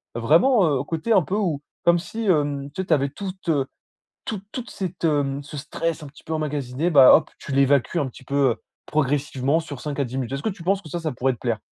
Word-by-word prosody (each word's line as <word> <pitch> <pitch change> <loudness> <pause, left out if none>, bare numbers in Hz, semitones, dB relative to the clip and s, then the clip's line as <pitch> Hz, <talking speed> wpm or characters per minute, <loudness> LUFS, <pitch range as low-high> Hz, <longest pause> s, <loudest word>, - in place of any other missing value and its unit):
heu, - - -2
vraiment, 180 - +4 0.2
heu, - - -4
côté 165 +9 -3
un 195 - +6
peu 185 +5 -3
où 170 -9 0 0.2
comme 170 0 +5
si, 220 +6 -5
hem, 145 -6 +1
tu 190 - -2
avais 140 -3 +3
toute 190 +3 -7 0.8
toute 210 -4 -4
toute 250 -1 -6
cette, 185 -2 -5
hem 145 -3 +1
ce 150 +1 -9
stress 160 +3 -3
un - - -7
petit 140 - -17
peu 160 - -6
emmagasiné, 150 0 -1
bah, 140 -5 +8
hop! 155 - +3
Tu 140 - -7
l'évacues 140 +1 +3
un 140 - 0
petit 130 +1 -14
peu 140 -3 +2 0.3
progressivement 145 0 0
sur 145 -5 -8
5 145 -1 -5
à - - +2
10 125 +1 -6
minutes. 130 -2 -3
Est-ce 140 +1 -3
que - - 0
tu 190 -3 -10
penses 195 +2 +1
que 160 - -11
ça 165 -3 -3
pourrait 130 +2 0
te - - -17
plaire? 115 -2 -1
150 Hz, 230 wpm, -23 LUFS, 140-175 Hz, 0.8 s, bah